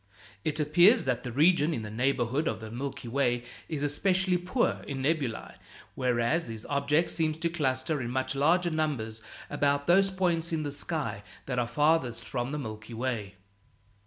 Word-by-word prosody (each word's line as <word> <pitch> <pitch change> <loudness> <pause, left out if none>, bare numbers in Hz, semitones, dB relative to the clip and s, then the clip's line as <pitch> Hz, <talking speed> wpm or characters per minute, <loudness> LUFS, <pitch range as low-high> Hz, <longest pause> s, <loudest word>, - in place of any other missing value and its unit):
It 155 0 -1
appears 175 - +5
that 125 -2 0
the 125 - -5
region 155 +3 +3
in 110 - -4
the 105 - -6
neighborhood 130 +4 0
of 110 - -1
the 110 0 -8
Milky 125 +1 -5
Way 120 -1 +1 0.3
is 150 -3 -3
especially 185 +5 +2
poor 185 +8 0
in 135 -2 -4
nebulæ, 140 -6 -1 0.4
whereas 125 +5 +1
these 115 -1 -7
objects 145 +3 +1
seem 160 -2 +1
to 160 +2 -2
cluster 145 -2 0
in 120 - -3
much 130 +1 -1
larger 170 +5 +2
numbers 130 -9 -2 0.3
about 140 0 +1
those 195 +4 +5
points 175 -3 0
in 160 -2 -1
the 145 - -3
sky 140 -7 -3 0.2
that 125 -2 -1
are 120 - 0
farthest 150 -4 +1
from 120 0 -3
the 150 - -2
Milky 110 -3 -7
Way. 110 -5 -3
140 Hz, 170 wpm, -29 LUFS, 120-160 Hz, 0.4 s, appears